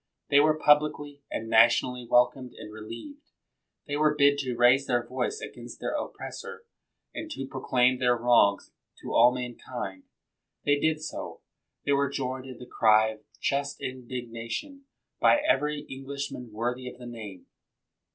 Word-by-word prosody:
They 140 - +7
were 155 +1 +4
publicly 150 -1 +2
and 115 - -4
nationally 120 +2 +4
welcomed 125 +1 +2
and 105 - -10
relieved. 115 - -10 0.6
They 145 - -3
were 150 0 +3
bid 145 -1 +4
to 130 -3 -2
raise 125 +3 +4
their 120 -1 +1
voice 130 - -2
against - - -9
their - - -3
oppressor, 470 0 -6 0.5
and 320 - -6
to 135 - -5
proclaim 130 -1 +1
their 125 -1 +3
wrongs 115 -4 +3 0.3
to - - -5
all 120 +2 +7
mankind. 120 -5 -6 0.6
They 145 0 +3
did 155 0 0
so. 155 - -6 0.4
They - - +1
were 140 0 +2
joined 130 -1 -4
in 130 -2 -9
the 125 - -10
cry 110 -2 +4
of 110 -1 -8 0.2
just 140 0 -1
indignation 125 - -6 0.3
by - - +6
every 150 - +1
Englishman 135 -3 -6
worthy 125 +3 -3
of - - -13
the 125 - -11
name. 110 -6 -9
130 Hz, 150 wpm, -28 LUFS, 120-145 Hz, 0.6 s, They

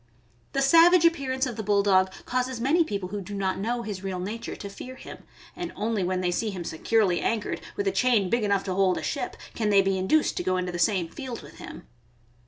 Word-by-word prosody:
The 275 - +1
savage 335 +4 +6
appearance 270 -5 +1
of 245 -4 -5
the - - -2
Bulldog 200 -2 +3
causes 255 -1 -1
many 295 +8 +3
people 200 - -4
who 205 +1 -4
do 200 +2 -7
not 190 -1 -1
know 235 +4 -2
his 200 -3 -6
real 190 -2 -3
nature 210 +6 -5
to 200 - -7
fear 250 +6 -9
him, - - -10 0.4
and 350 -1 -5
only 215 -2 -1
when 185 +1 -1
they 180 -1 0
see 215 +5 -1
him 185 -4 -5
securely 180 +3 +1
anchored, 220 -2 -1
with 405 0 -2
a - - +3
chain 240 - +2
big 235 +4 +1
enough 200 -2 +1
to 190 - -3
hold 190 -1 +2
a - - -4
ship, - - -3 0.2
can 215 -2 -1
they 200 -1 +5
be 195 0 0
induced 295 +12 +2
to - - -1
go 185 0 +1
into 180 0 -2
the 175 - -5
same 175 -1 +2
field 250 +6 -7
with - - -14
him. - - -9
205 Hz, 230 wpm, -26 LUFS, 190-255 Hz, 0.4 s, savage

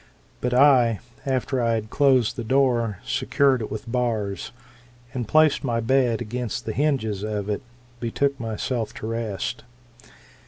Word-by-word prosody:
But 125 - 0
I, 125 -6 +5 0.3
after 130 0 0
I 115 -1 +2
had 110 -1 -4
closed 130 -5 +3
the 120 - -4
door, 120 -4 +2
secured 135 -3 +2
it 110 - -4
with 110 +2 -6
bars, 110 -6 -1 0.6
and 125 -5 -3
placed 155 +3 +4
my 120 -4 0
bed 120 -1 +2
against 120 -1 -4
the 110 - -3
hinges 130 -9 0
of 105 -1 -3
it, 105 - -2 0.4
betook 140 +4 -1
myself 115 +1 -3
to - - -7
rest. 115 0 -3
120 Hz, 145 wpm, -24 LUFS, 110-130 Hz, 0.6 s, I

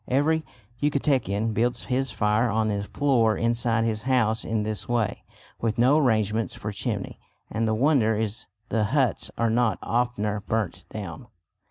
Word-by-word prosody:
Every 155 +5 +2 0.4
Yucatecan 130 - +1
builds 120 +2 +1
his 130 +1 -1
fire 105 +3 +1
on 110 0 +1
the 100 -1 -1
floor 115 -4 +2
inside 115 -1 +1
his 110 -2 -1
house 115 -2 +1
in 110 -1 -1
this 110 +1 -4
way, 115 -4 0 0.4
with 115 -1 -1
no 130 +6 +5
arrangements 110 -4 +1
for 105 - -5
chimney, 105 -1 -4 0.3
and 115 +1 0
the 110 - +1
wonder 120 -3 +3
is 110 +1 -2 0.2
the 110 -2 +1
huts 130 +3 +1
are 115 -1 +1
not 115 -3 +2
oftener 105 -2 0
burnt 110 -5 -2
down. 110 +4 -7
115 Hz, 155 wpm, -25 LUFS, 105-125 Hz, 0.4 s, no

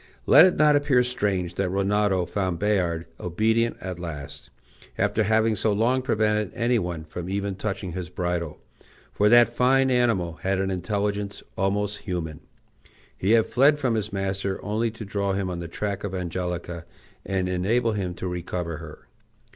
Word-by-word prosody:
Let 165 - +8
it 180 - 0
not 150 -1 +5
appear 145 -4 +3
strange 100 -8 -1
that 95 0 -1
Rinaldo 100 -1 +1
found 95 -2 -2
Bayard 90 -5 0
obedient 110 +6 +1
at 90 -1 -6
last, 75 -4 -7 0.5
after 100 +3 +1
having 110 +1 +3
so 110 0 +1
long 120 +5 +2
prevented 105 -4 +1
any 120 0 +2
one 85 -4 -4
from 85 +3 -7
even 100 0 -2
touching 95 -1 -4
his 90 0 -5
bridle; 90 -3 -3 0.5
for 105 +1 +3
that 120 +1 +6
fine 130 +1 +3
animal 110 -10 +1
had 95 0 0
an 95 0 0
intelligence 100 +1 -2
almost 100 0 -1
human; 85 -6 -4 0.8
he 100 +4 +1
had 115 -1 +5
fled 140 +4 +4
from 130 -5 0
his 110 -1 -2
master 95 0 -2
only 110 +3 0
to 110 0 -8
draw 100 -1 -1
him 95 -1 -2
on 85 - -4
the 85 - -5
track 100 +3 -4
of 100 -2 -3
Angelica, 90 -1 -4 0.4
and 95 -1 -1
enable 110 +6 +1
him 95 -4 -3
to 95 - -5
recover 90 -2 -4
her. 75 0 -11
100 Hz, 165 wpm, -25 LUFS, 90-110 Hz, 0.8 s, Let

